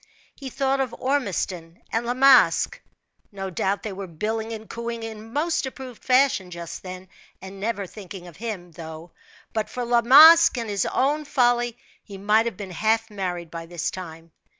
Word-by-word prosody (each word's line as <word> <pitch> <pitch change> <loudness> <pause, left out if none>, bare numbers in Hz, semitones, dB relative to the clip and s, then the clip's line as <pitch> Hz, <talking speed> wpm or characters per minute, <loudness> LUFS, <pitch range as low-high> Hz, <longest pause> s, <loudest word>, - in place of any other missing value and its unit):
He 270 -2 -8
thought 270 +1 0
of 260 -3 -2
Ormiston 190 - -2
and 230 +1 -1
La 245 - -1
Masque 255 -10 +5 0.5
no 195 -2 -6
doubt 190 +3 -1
they 215 - -4
were 195 0 -7
billing 220 +7 -3
and 220 -1 -7
cooing 235 0 -5
in 220 0 -8
most 300 +1 0
approved 260 -3 -10
fashion 255 -8 +3
just 170 -1 -7
then, 185 0 -9 0.3
and 190 +1 -10
never 205 -1 -2
thinking 190 -2 -10
of 170 - -13
him; 195 -5 -6
though, 160 +1 -10 0.4
but 220 -1 -2
for 250 -1 -4
La 240 0 +3
Masque 310 +5 +8
and 230 -3 -3
his 200 -2 0
own 290 +3 0
folly, 240 -4 +1 0.2
he 200 -2 -11
might 210 +4 +2
have 220 -6 -5
been 200 -3 -7
half 220 +4 0
married 180 -4 -4
by 165 0 -7
this 175 -1 -3
time. 165 -2 -9
215 Hz, 175 wpm, -24 LUFS, 185-245 Hz, 0.5 s, Masque